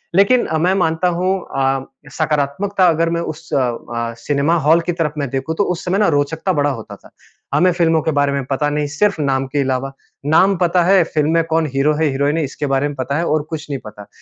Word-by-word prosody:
लेकिन 200 +6 +4
मैं 180 +3 +3
मानता 165 -1 +1
हूँ 180 +2 -1 0.3
अ, 135 0 0 0.3
सकारात्मकता 160 +6 0
अगर 165 0 +1
मैं 170 0 -1
उस 165 0 -7
अ, 120 -2 -2
सिनेमा 145 +7 +1
हाल 165 +2 +5
की - - +4
तरफ 160 -3 -1
में 140 -3 -2
देखूँ 135 +5 -3
तो - - +3
उस 180 -3 -3
समय 185 +2 0
ना 210 - +3
रोचकता 160 +6 0
बड़ा 145 -1 +1
होता 115 -6 -6
था। - - -19 0.4
हमें 180 0 +4
फ़िल्मों 165 -2 +2
के 160 - -1
बारे 145 -1 +1
में 140 -1 -1
पता 140 +2 -1
नहीं 150 0 -1
सिर्फ़ 160 +4 0
नाम 135 -1 0
के 145 +2 -1
अलावा, 135 0 -1 0.3
नाम 185 +6 +4
पता 175 0 +2
है 190 0 +5
फ़िल्म 155 -1 0
में 165 0 +3
कौन 160 0 +1
हीरो 140 +3 +2
है - - +3
हीरोइन 140 +3 0
है 160 - 0
इसके 145 +2 -4
बारे 135 +1 +1
में 145 - -6
पता 135 +2 -2
है 170 - 0
और 155 -1 +1
कुछ 160 -3 -6
नहीं 140 -2 -3
पता। 105 -1 -11
150 Hz, 230 wpm, -18 LUFS, 140-170 Hz, 0.4 s, हाल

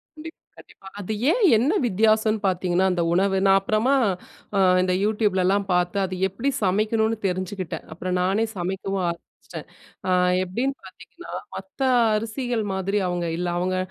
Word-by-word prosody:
கண்டிப்பா, 320 +1 -11 0.2
கண்டிப்பா. 195 - -16
அது 205 +2 -4 0.2
ஏன் 470 +5 +1
என்ன 270 - +1
வித்தியாசம்ன்னு 215 +1 +2
பாத்தீங்கன்னா, 180 0 +1
அந்த 175 -1 0
உணவு 195 +2 +2
நான் 195 0 +6
அப்பறமா 215 +7 +1 0.6
அ - - +3 0.2
இந்த 185 0 +1
யூடியூப் 210 -2 +1
லலாம் 195 +2 +1
பாத்த 180 0 +1
அது 185 0 -5
எப்பிடி 235 +9 -2
சமைக்கணுன்னு 220 +3 +1
தெரிஞ்சுக்கிட்டேன். 185 -1 -4
அப்புறம் 180 +2 -3
நானே 195 +5 +1
சமைக்கவும் 190 +1 -3
ஆரம்பிச்சுட்டேன். 170 - -9 0.4
அ, - - 0 0.3
எப்பிடின்னு 245 +9 -2
பாத்தீங்கன்னா, 340 - -13 0.2
மத்த 285 - -10 0.4
அரிசிகள் 230 +1 -2
மாதிரி 195 +2 -1
அவுங்க 175 -1 -2
இல்ல. 180 0 -2
அவுங்க 185 +1 -1
195 Hz, 140 wpm, -23 LUFS, 185-220 Hz, 0.6 s, நான்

